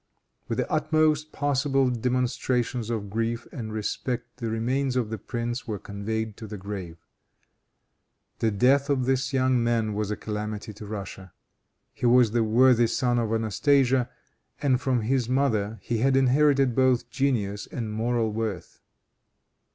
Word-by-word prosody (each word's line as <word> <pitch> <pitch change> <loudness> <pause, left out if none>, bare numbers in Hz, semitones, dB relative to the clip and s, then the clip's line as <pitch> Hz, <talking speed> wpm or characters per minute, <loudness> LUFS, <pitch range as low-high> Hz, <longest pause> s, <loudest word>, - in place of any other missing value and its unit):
With - - -2
the - - -2
utmost 155 -1 +2
possible 135 -2 +1
demonstrations 125 -1 -1
of 105 -4 -3
grief 115 +2 -2
and 110 -5 -6
respect 120 +3 -4
the 115 -3 -3
remains 125 +4 -1
of 120 -4 -1
the 110 - -4
prince 120 +4 -4
were 110 -2 -2
conveyed 105 +2 -4
to 110 - -8
the 105 0 -7
grave. 95 -4 -6 1.4
The 115 - +2
death 130 +7 +3
of 130 -3 +1
this 135 +1 0
young 130 -2 +2
man 115 -2 +1
was 105 0 -2
a 105 - -1
calamity 105 0 -5
to 105 +1 -10
Russia. 100 -3 -7 0.6
He 125 - -1
was 120 -2 +5
the 115 0 +2
worthy 120 +1 +4
son 120 +1 +1
of 115 -2 -1
Anastasia, 125 +3 +2 0.5
and 135 -3 +1
from 130 -3 +1
his 125 +1 0
mother 115 -5 +1
he 115 -2 -1
had 135 +2 +3
inherited 135 0 +3
both 130 -1 +2
genius 105 -7 -1
and 110 -3 -5
moral 115 0 0
worth. 105 -5 -4
120 Hz, 150 wpm, -26 LUFS, 110-130 Hz, 1.4 s, was